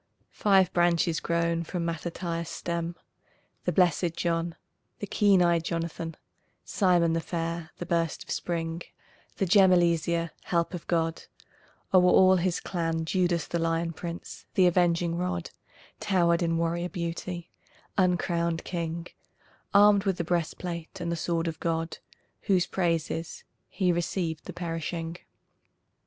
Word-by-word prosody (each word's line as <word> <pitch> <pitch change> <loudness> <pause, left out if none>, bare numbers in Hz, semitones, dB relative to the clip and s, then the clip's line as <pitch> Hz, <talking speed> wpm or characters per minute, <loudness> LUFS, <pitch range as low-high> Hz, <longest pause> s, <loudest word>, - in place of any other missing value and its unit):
Five 195 -3 +3
branches 170 -2 +2
grown 170 0 0
from 170 +1 -3
Mattathias' 170 0 -3
stem, 170 0 -3 0.7
The 180 - +2
Blessed 175 -1 +2
John, 165 -1 -1 0.4
the - - -4
Keen 200 -2 +4
Eyed 170 -1 +3
Jonathan, 165 -1 -4 0.5
Simon 175 -4 +3
the 165 - +1
fair, 165 0 -3
the 175 - -5
Burst 170 -2 -1
of - - -9
Spring, 165 -1 -2 0.6
the 195 - +1
Gem, 190 +1 +6
Eleazar, 170 -1 +2
Help 170 0 0
of 175 - -6
God; 165 -1 0 0.7
o'er 185 - +8
all 185 +1 +6
his 180 0 0
clan 165 -2 -2
Judas 175 -1 +1
the 170 - -2
Lion 165 0 0
Prince, 170 +1 -7
the 185 - +5
Avenging 175 -1 +2
Rod, 180 -1 -2 0.5
Towered 170 -3 +2
in 165 -1 +1
warrior 170 +1 -1
beauty, 175 -1 -5 0.4
uncrowned 170 -3 +1
king, 170 -1 -3 0.7
Armed 205 0 +6
with 190 -2 +1
the 170 - -1
breastplate 170 0 -3
and 170 -1 -2
the - - 0
sword 170 0 -1
of 160 -1 -4
God, 165 0 -2 0.5
Whose 185 -3 +4
praise 165 -3 0
is: 165 0 -5 0.3
"He 185 -3 +1
received 170 -2 -2
the - - -7
perishing." 165 0 -4
170 Hz, 135 wpm, -28 LUFS, 165-180 Hz, 0.7 s, o'er